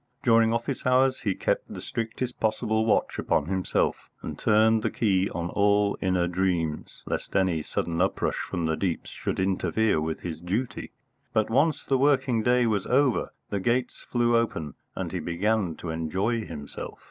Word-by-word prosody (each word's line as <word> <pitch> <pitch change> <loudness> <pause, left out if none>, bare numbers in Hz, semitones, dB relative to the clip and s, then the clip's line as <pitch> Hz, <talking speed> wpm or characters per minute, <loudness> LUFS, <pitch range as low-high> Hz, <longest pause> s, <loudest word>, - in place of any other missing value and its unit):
During 115 -3 +5
office 120 +3 -2
hours 130 +1 +3
he 100 -4 -1
kept - - -1
the - - -6
strictest 115 +2 -4
possible 110 0 +1
watch - - +1
upon - - +1
himself, 95 +2 -1
and - - -5
turned 110 +1 +4
the - - 0
key 95 -4 +1
on 85 0 -4
all 100 0 +3
inner 90 -2 +1
dreams, 85 -4 -2
lest - - -4
any 90 -4 +2
sudden 85 +2 -2
uprush 95 - 0
from 85 -3 -3
the 80 0 +1
deeps 90 -1 -2
should - - -3
interfere 95 0 +1
with 80 0 -3
his 85 -2 -5
duty. 105 +8 -3 0.4
But, 110 0 +1
once 145 +5 +2
the 135 -1 +1
working 130 -4 +3
day 125 +2 +3
was 105 -4 0
over, 130 -1 +2 0.2
the 100 - 0
gates 120 +5 0
flew 120 -1 +1
open, 80 - 0 0.2
and - - -3
he - - -2
began 95 0 0
to 85 - -5
enjoy 95 +9 -1
himself. 75 -3 -7
105 Hz, 170 wpm, -26 LUFS, 90-115 Hz, 0.4 s, During